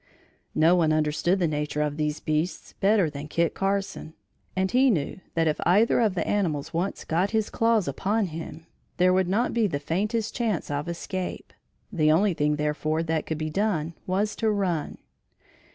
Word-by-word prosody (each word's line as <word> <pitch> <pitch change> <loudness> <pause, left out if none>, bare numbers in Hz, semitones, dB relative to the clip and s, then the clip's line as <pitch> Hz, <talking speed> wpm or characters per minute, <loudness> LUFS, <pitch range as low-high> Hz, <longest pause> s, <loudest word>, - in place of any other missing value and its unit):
No 165 +3 +5
one 165 -3 +3
understood 155 +4 +1
the 175 -3 +1
nature 150 0 -1
of 150 -1 -2
these 150 0 -1
beasts 155 +3 -2
better 200 -3 +3
than 145 0 -6
Kit 170 +1 0
Carson 195 -4 -2 0.4
and 190 0 0
he 260 +2 +4
knew 165 - -1 0.2
that 165 -1 +2
if 155 - 0
either 205 +8 +4
of 215 -5 +2
the 175 - -1
animals 165 -9 -1
once 175 +4 -2
got 180 +5 +1
his 220 -1 -1
claws 225 -5 +2
upon 200 +10 0
him, 165 0 -7 0.3
there 185 +1 +4
would 185 -1 +2
not 220 +6 +1
be 230 -3 +2
the 155 -7 -2
faintest 205 +9 -1
chance 220 -11 -1
of 145 +3 -2
escape. 180 +2 -5 0.4
The 155 -4 +3
only 190 +5 +3
thing 150 -1 +1
therefore 150 +2 -1
that 160 -1 -1
could 160 - -2
be 155 0 -3
done 170 -5 0
was 200 +3 0
to 220 - +1
run. 185 -7 -1
170 Hz, 180 wpm, -26 LUFS, 155-200 Hz, 0.4 s, No